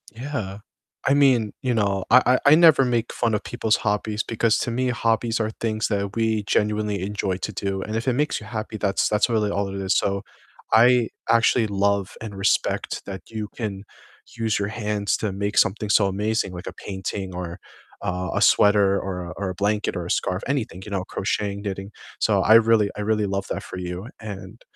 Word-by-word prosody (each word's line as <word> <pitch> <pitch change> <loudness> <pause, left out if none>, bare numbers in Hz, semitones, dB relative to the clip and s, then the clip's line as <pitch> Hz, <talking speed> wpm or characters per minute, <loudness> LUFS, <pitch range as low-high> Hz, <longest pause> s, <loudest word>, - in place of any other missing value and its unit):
Yeah, 115 -6 -5 0.5
I 135 - +4
mean, 130 -7 +4
you 125 -1 0
know, 100 -4 0
I - - +7 0.2
I 145 - +7
I - - +9
never 160 -4 +6
make 120 -2 -1
fun 115 -2 0
of 105 - -1
people's 110 0 0
hobbies 105 0 -1
because 115 -1 +1
to 120 - -2
me, 130 +2 0
hobbies 115 -1 0
are 110 -1 -1
things 110 -1 -1
that 100 -1 -2
we 110 -2 +1
genuinely 105 -1 0
enjoy 95 -1 -2
to 100 - -4
do 95 0 -2
and 110 +3 -4
if 115 +3 -3
it 130 - +3
makes 150 +4 0
you 105 - -11
happy 110 -1 -5
that's 100 -2 +1
that's 105 +3 +2
really 110 -3 +1
all 100 0 -1
it 95 - -6
is 95 -1 +1
so, 100 0 0 0.5
I 120 +1 +5 0.2
actually 115 0 +4
love 100 -1 0
and 110 -3 -7
respect 95 +1 0
that 95 -2 -6
you 110 -2 -5
can 100 -4 -4 0.5
use 110 -2 0
your 100 0 -1
hands 105 -2 -1
to 110 - -2
make 100 +2 -3
something 105 +2 +2
so 105 0 +4
amazing, 105 0 -1
like 90 0 -8
a - - -3
painting 95 -1 -5
or, 90 0 -6 0.4
uh, 90 0 -2
a - - 0
sweater 100 -1 +5
or 90 -2 -4
a 85 - -7
or 100 -1 -2
a - - -3
blanket 105 +3 0
or 90 - -4
a 90 - -3
scarf, 90 +1 0
anything, 125 -9 -2
you 105 - -9
know, 95 -2 -1
crocheting, 100 +1 -2
knitting. 100 0 -5 0.3
So, - - +2
I 110 - +5
really 115 -2 +5
I - - -3
really 105 0 +1
love 100 0 -2
that - - -3
for - - -8
you 90 +3 -5
and, 105 -4 -9
105 Hz, 205 wpm, -23 LUFS, 100-115 Hz, 0.5 s, I